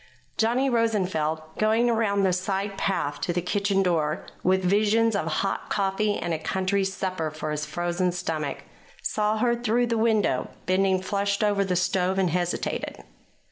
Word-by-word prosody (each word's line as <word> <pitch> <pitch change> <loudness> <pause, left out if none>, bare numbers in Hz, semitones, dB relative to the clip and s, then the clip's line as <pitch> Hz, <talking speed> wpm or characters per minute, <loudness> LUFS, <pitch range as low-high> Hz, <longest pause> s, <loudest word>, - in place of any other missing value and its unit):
Johnny 240 +4 +2
Rosenfeld, 190 - 0 0.2
going 220 +3 +3
around 220 -4 +2
the 185 -1 +3
side 195 +2 -2
path 190 -7 -1
to - - 0
the 175 - 0
kitchen 195 +2 +1
door 160 -4 0 0.2
with 190 +1 +2
visions 215 +4 +3
of 180 -5 -1
hot 195 +5 -2
coffee 205 +1 0
and 170 -1 -2
a 160 - -2
country 190 +4 0
supper 185 -4 -2
for 155 0 -5
his 150 0 -3
frozen 175 +1 -1
stomach, 160 -5 -3 0.4
saw 215 0 0
her 235 +2 +2
through 240 +1 +1
the 230 -1 0
window 220 - +2 0.2
bending 190 0 +2
flushed 200 +1 0
over 205 -1 +2
the 185 -2 -1
stove, 180 +1 +1
and 185 -3 +2
hesitated. 175 0 -2
195 Hz, 160 wpm, -26 LUFS, 175-215 Hz, 0.4 s, going